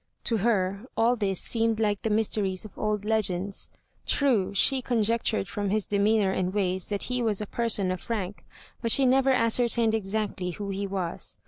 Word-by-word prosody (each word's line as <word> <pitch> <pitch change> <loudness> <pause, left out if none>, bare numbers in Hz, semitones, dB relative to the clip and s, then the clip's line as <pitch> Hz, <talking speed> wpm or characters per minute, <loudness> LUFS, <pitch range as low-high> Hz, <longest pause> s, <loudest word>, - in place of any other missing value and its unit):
To 230 - +1
her 200 0 0
all 235 +2 +3
this 195 -5 -1
seemed 225 -1 +1
like 205 -2 0
the 225 - -2
mysteries 210 -3 0
of 215 - -12
old 210 -1 -2
legends. 200 -3 -1 0.4
True, 245 -10 +1
she 265 +6 +4
conjectured 225 -3 0
from 205 +1 -3
his 215 0 +1
demeanor 205 -1 +2
and 185 -1 -1
ways 185 -2 -1
that 205 -1 -1
he 250 0 -2
was 220 -4 0
a 210 - -3
person 210 -4 0
of 185 - -6
rank, 205 -4 -4 0.4
but 230 - -1
she 270 +4 +5
never 265 +1 +3
ascertained 230 -2 +2
exactly 205 -3 -2
who 200 +3 -6
he 200 +1 -3
was. 190 -3 -4
210 Hz, 180 wpm, -26 LUFS, 195-230 Hz, 0.4 s, she